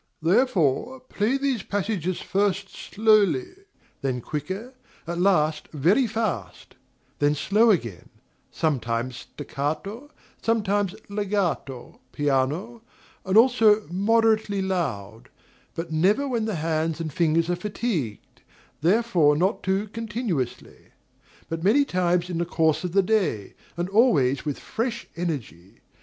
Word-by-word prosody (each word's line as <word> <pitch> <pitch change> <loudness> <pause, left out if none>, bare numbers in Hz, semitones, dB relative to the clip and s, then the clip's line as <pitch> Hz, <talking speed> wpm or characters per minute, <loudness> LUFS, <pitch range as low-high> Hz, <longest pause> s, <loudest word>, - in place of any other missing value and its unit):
Therefore 200 - +2
play 250 0 -1
these 270 -5 -1
passages 190 -3 -2
first 195 0 0
slowly, 220 - +2 0.5
then 130 -2 -1
quicker, 185 - -5 0.3
at 170 +1 -4
last 155 -5 +2
very 180 - +2
fast; 200 - -4 0.5
then 145 0 +3
slow 215 +9 +3
again, 120 - -1 0.4
sometimes 125 -5 -1
staccato, 160 - -4 0.3
sometimes 205 -3 0
legato, 195 -10 -2
piano, 145 - -1 0.4
and 190 +2 +2
also 225 -3 +5
moderately 215 +1 +2
loud; 125 - -3 0.5
but 165 0 -5
never 195 - +2
when 235 -4 -1
the 220 -3 -2
hands 160 0 -1
and 160 -3 -4
fingers 165 0 +2
are 175 - 0
fatigued, 180 - -4 0.4
therefore 175 -5 +3
not 185 +5 +1
too 195 +2 0
continuously; 210 - -4 0.5
but 165 0 -4
many 255 +9 +4
times 180 -4 +1
in 175 -2 -3
the 170 - 0
course 160 -2 +1
of 180 -2 -4
the 195 0 +4
day, 180 - 0 0.2
and 175 +1 -1
always 155 - +3
with 145 -2 -2
fresh 235 +1 -3
energy. 125 - -5
185 Hz, 120 wpm, -25 LUFS, 155-215 Hz, 0.5 s, also